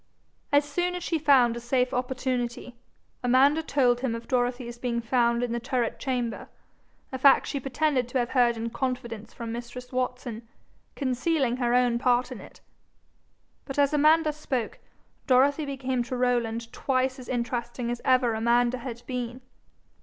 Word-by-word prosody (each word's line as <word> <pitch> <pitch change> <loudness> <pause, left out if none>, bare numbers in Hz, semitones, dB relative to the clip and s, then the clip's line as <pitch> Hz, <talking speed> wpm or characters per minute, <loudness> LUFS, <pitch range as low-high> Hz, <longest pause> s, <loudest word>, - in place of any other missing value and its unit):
As 285 0 +4
soon 355 +5 -1
as 355 - -5
she 330 - -1
found 265 -6 +4
a - - -4
safe 250 +1 0
opportunity, 250 -1 -2 0.5
Amanda 270 +5 +4
told 255 -6 +2
him 245 -3 -1
of 230 - -8
Dorothy's 245 -1 -1
being 240 -1 -1
found 235 0 +1
in 245 - -2
the 235 - -1
turret 245 -1 -2
chamber, 250 -4 -3 0.6
a 260 - -4
fact 275 +1 +6
she 280 - -3
pretended 270 -1 0
to 250 - -2
have 240 -1 0
heard 240 -3 +3
in 230 +1 -4
confidence 235 -3 -4
from 230 -1 -6
mistress 245 +1 -7
Watson, 250 -3 -3 0.5
concealing 260 -1 0
her 245 -1 +1
own 245 -1 +3
part 250 0 +2
in - - -7
it, - - -15 1.0
But 270 - -7
as 285 0 +3
Amanda 305 +1 +4
spoke, 260 -6 -3 0.5
Dorothy 280 +3 +4
became 260 -2 -2
to 250 +1 -4
Rowland 235 -2 -1
twice 260 0 0
as 250 - -10
interesting 240 0 -2
as 240 - -4
ever 255 -3 +3
Amanda 240 +2 +2
had 240 -1 -7
been. 250 -1 -4
250 Hz, 160 wpm, -27 LUFS, 240-265 Hz, 1.0 s, fact